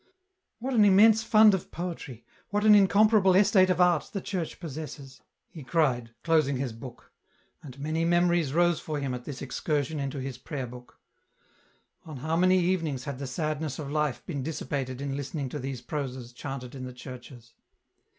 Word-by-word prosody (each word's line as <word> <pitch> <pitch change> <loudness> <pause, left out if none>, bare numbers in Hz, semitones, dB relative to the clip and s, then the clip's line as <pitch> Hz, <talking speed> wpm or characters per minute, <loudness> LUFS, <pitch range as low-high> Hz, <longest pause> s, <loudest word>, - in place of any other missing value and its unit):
" 375 -1 -55
What 265 +2 -2
an 220 -3 +5
immense 210 +2 +6
fund 215 -2 +6
of 190 - -2
poetry, 165 -9 -6 0.2
what 205 +1 0
an 215 - +8
incomparable 205 -1 +5
estate 190 -1 +5
of 180 -1 +1
art 175 -3 +3
the 200 - -2
Church 185 -4 -4
possesses! 145 -4 -8
" - - -56
he 160 - -9
cried, 130 -6 +1
closing 155 -5 +2
his 130 -3 -3
book; 120 +1 -11 0.5
and 135 -3 -11
many 155 +3 -1
memories 175 -3 +2
rose 175 +2 +2
for 150 -2 -4
him 135 -2 -3
at 125 -1 -6
this 140 -3 -6
excursion 145 +2 -2
into 140 0 -3
his 130 -1 -6
prayer 135 -1 -5
book. 125 0 -12 1.0
On 155 -4 -9
how 155 +5 -2
many 185 +2 +4
evenings 165 -7 0
had 140 -2 -6
the 140 - -4
sadness 155 +2 -3
of 145 -3 -6
life 150 -3 -1
been 145 -6 -4
dissipated 135 -3 -4
in 140 -1 -3
listening 140 0 -4
to 150 - -5
these 130 -2 -5
proses 130 -5 -5
chanted 130 -1 -7
in 130 -2 -7
the 125 - -8
churches 125 -1 -11
150 Hz, 180 wpm, -28 LUFS, 130-175 Hz, 1.0 s, an